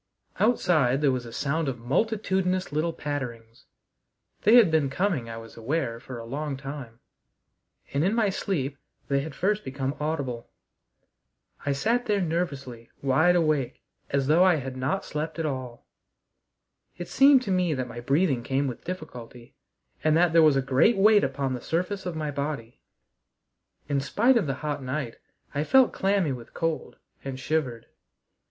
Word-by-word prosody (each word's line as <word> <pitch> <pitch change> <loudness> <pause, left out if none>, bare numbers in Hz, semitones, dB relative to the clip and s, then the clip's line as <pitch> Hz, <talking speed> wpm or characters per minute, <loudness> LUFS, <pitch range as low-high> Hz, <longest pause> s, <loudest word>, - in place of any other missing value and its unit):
Outside 155 - +3
there 145 -3 +4
was 125 -2 -3
a - - -9
sound 145 +5 -1
of 130 -2 -2
multitudinous 185 - 0
little 155 +3 0
patterings. 120 -7 -6 0.8
They 220 +4 +6
had 230 -9 +7
been 155 -4 +2
coming, 165 - -1
I 115 - -6
was 115 0 -11
aware, 115 0 -2
for 125 0 -8
a 115 - -7
long 140 +3 -4
time, 135 -4 -8 1.0
and 140 +2 +1
in 195 +5 +2
my 220 -3 +2
sleep 140 -9 -2 0.3
they 140 0 +2
had 140 +1 -6
first 210 +3 0
become 135 +1 -3
audible. 140 -6 -3 1.2
I 140 - +2
sat 235 - 0
there 205 -2 +2
nervously 140 -9 -3
wide 160 +7 +4
awake 155 -7 0 0.3
as 140 -1 +1
though 160 +6 +5
I 185 -2 +5
had 130 -3 -5
not 140 +10 -1
slept 155 +2 -4
at 165 - -2
all. 130 -5 -5 1.1
It 175 - -6
seemed 275 -1 +6
to 200 - -3
me 180 -4 +1
that 130 -1 -3
my 120 0 -8
breathing 135 +1 +1
came 135 +3 0
with 125 -3 -5
difficulty, 125 -9 -8 0.5
and 155 0 +4
that 170 -1 +3
there 165 - +7
was 155 -3 +5
a 135 - +1
great 135 - +3
weight 210 +1 +6
upon 135 -1 -1
the 125 - -5
surface 185 - -2
of 175 - -4
my 155 -2 -2
body. 140 -5 -4 1.1
In 140 -1 +1
spite 230 - +3
of 220 -10 +2
the 135 - -1
hot 145 -1 -2
night, 130 -2 -4 0.4
I 145 +1 0
felt 260 +8 +4
clammy 195 -5 +1
with 125 -1 -8
cold 165 -1 -2 0.3
and 135 -1 -5
shivered. 130 -4 -2
145 Hz, 165 wpm, -26 LUFS, 130-180 Hz, 1.2 s, had